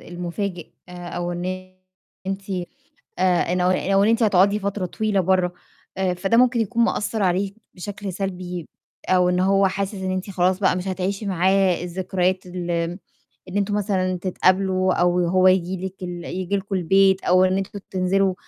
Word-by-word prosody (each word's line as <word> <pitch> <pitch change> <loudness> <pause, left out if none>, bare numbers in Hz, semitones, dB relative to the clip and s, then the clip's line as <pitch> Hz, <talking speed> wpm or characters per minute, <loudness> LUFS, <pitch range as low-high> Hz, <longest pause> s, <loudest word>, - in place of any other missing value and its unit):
المفاجئ 175 +1 -5 0.2
أو 175 0 -5
إن 185 +1 -5 0.5
أنتِ 195 +1 -4 0.7
آآ، 180 -2 +2
إنه 180 0 +1
أو 180 - +3
أو 195 +1 +2
إن 215 - +3
أنتِ 230 0 +3
هتقعدي 200 0 +4
فترة 200 -1 -2
طويلة 210 +1 -1
بَرّه، 185 -1 +2 0.4
آآ 185 -2 +1
فده 195 +6 +1
ممكن 250 -1 +4
يكون 230 +2 +1
مأثّر 210 -1 0
عليه 190 +2 +1 0.2
بشكل 200 0 -6
سلبي 180 -3 -4 0.4
أو 180 -1 +4
إن 180 - +1
هو 195 +1 +3
حاسس 195 +2 -3
إن 190 -1 -3
أنتِ 185 +2 -3
خلاص 185 0 +1
بقى 190 -2 +2
مش 180 +1 -4
هتعيشي 190 +3 -2
معاه 190 -1 +2
الذكريات 185 +1 -1
ال 180 -1 -5 0.8
إن 190 - -3
أنتم 205 0 0
مثلًا 190 -3 0
تتقابلوا 185 0 +2
أو 175 0 +2
هو 185 +1 +4
ييجي 185 0 +1
لِك 190 0 -7
ال 175 -1 -6
ييجي 185 +2 -2
لكم 195 +1 -4
البيت 190 +2 +3
أو 185 +1 +4
إن 185 0 +2
أنتم 195 +1 -4
تنزلوا 190 +1 +1
185 Hz, 165 wpm, -22 LUFS, 180-195 Hz, 0.8 s, هتقعدي